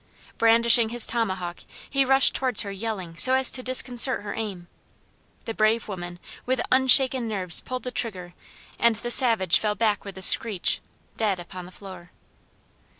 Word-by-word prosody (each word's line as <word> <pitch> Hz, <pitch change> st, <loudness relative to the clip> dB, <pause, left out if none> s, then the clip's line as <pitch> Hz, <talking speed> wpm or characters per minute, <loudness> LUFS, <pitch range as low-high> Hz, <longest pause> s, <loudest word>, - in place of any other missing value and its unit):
Brandishing 230 Hz, 0 st, +5 dB
his 240 Hz, 0 st, +2 dB
tomahawk 190 Hz, -7 st, -5 dB, 0.3 s
he 275 Hz, -1 st, -1 dB
rushed 270 Hz, +1 st, +3 dB
towards 255 Hz, -5 st, +1 dB
her 200 Hz, -, -7 dB
yelling 195 Hz, -4 st, -7 dB
so 260 Hz, +6 st, +4 dB
as 265 Hz, -1 st, +2 dB
to 255 Hz, -, -2 dB
disconcert 255 Hz, -1 st, 0 dB
her 205 Hz, -, -7 dB
aim. 195 Hz, -6 st, -8 dB, 0.8 s
The 225 Hz, -, -6 dB
brave 220 Hz, +1 st, -1 dB
woman 175 Hz, -3 st, -9 dB, 0.3 s
with 260 Hz, 0 st, -3 dB
unshaken 260 Hz, -1 st, +5 dB
nerves 190 Hz, -5 st, 0 dB
pulled 255 Hz, 0 st, -8 dB
the 250 Hz, -, -7 dB
trigger, 185 Hz, -8 st, -4 dB, 0.5 s
and 235 Hz, -1 st, +1 dB
the 240 Hz, +2 st, -5 dB
savage 225 Hz, -9 st, +3 dB
fell 210 Hz, -1 st, -3 dB
back 215 Hz, -3 st, -2 dB
with 195 Hz, -2 st, -12 dB
a 190 Hz, -, -4 dB
screech, 205 Hz, -1 st, +2 dB, 0.4 s
dead 205 Hz, -5 st, -2 dB
upon 180 Hz, +1 st, -11 dB
the -, -, -16 dB
floor. 185 Hz, -2 st, -14 dB
220 Hz, 160 wpm, -22 LUFS, 190-245 Hz, 0.8 s, Brandishing